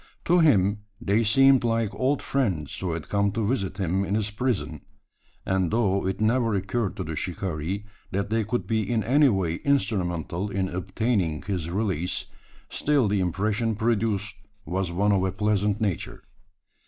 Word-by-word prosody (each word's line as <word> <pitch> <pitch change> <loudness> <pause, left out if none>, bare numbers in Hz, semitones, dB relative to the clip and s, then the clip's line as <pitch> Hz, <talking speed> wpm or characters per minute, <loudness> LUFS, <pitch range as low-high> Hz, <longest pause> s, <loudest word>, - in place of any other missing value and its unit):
To 175 +1 +4
him 100 - +4 0.2
they 110 0 +2
seemed 135 +4 +5
like 115 -2 0
old 135 +2 0
friends 95 - -1
who 90 -3 -2
had 80 -2 -5
come 100 0 +1
to 110 -1 -1
visit 95 -5 -1
him 95 0 0
in 100 +1 -1
his 105 -1 0
prison; 120 0 -2 0.6
and 95 -2 +1
though 100 -4 +1
it 95 - -2
never 115 0 +2
occurred 100 +1 -1
to - - -4
the 80 0 -5
shikaree, 90 +2 -3 0.3
that 100 +2 -2
they 115 0 +2
could 115 +4 -2
be 110 -1 0
in 110 +1 0
any 140 +6 +4
way 90 -6 0
instrumental 95 - 0
in 95 -1 -1
obtaining 95 -3 -1
his 90 -4 -3
release, 90 -2 -1 0.4
still 145 -6 +1
the 100 0 +1
impression 105 +5 0
produced 105 -2 0 0.3
was 90 0 -2
one 100 +4 +2
of 95 -2 +2
a 95 - 0
pleasant 105 +1 0
nature. 100 -7 -3
100 Hz, 165 wpm, -26 LUFS, 95-115 Hz, 0.6 s, seemed